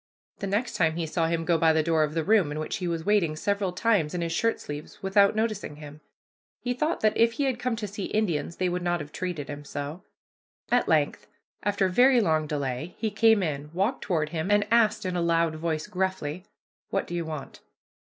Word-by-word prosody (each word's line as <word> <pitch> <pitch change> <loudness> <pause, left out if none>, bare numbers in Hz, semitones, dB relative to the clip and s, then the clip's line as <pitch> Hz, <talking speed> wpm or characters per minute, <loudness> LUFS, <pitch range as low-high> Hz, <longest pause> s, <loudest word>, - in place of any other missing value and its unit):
The 200 - -3
next 210 +5 -1
time 160 -2 +2
he 170 -1 -2
saw 165 +1 0
him 165 0 -1
go 170 -1 +2
by 160 0 +5
the 160 0 +2
door 160 -1 +2
of 155 +1 -2
the 165 - +1
room 200 -5 +3
in 150 - -4
which 155 - -3
he 180 - -3
was 165 -1 -2
waiting 195 -7 +2
several 200 +3 -1
times, 180 -5 +1
in 175 - -2
his 165 -1 -2
shirt 230 +7 +1
sleeves, 145 +4 -8
without 200 +1 +4
noticing 215 -8 -2
him. 150 0 -11 0.6
He 245 - -2
thought 305 +7 -1
that 215 -1 +3
if 230 0 +4
he 280 - -1
had 260 -3 0
come 250 -1 -1
to 220 -2 -4
see 200 0 -5
Indians 175 -6 -1
they 185 - 0
would 180 0 -1
not 175 0 0
have 150 -1 -8
treated 175 -6 -4
him 145 0 -7
so. 145 +4 -6 0.7
At - - +3
length, - - +1 0.3
after 200 -2 +1
very 250 +7 +5
long 155 -7 +1
delay, 145 +2 -3
he 220 -2 -1
came 220 -1 +4
in, 150 -3 -3
walked 200 +8 0
toward 160 -5 0
him, 165 +3 -3
and 205 0 +4
asked 225 -4 +3
in 185 -1 -2
a 175 - 0
loud 165 -1 +1
voice, 155 -1 -2
gruffly, 185 -4 -3 0.4
"What - - -1
do - - -8
you 170 -1 -1
want?" 155 -3 -7
175 Hz, 225 wpm, -27 LUFS, 155-205 Hz, 0.7 s, by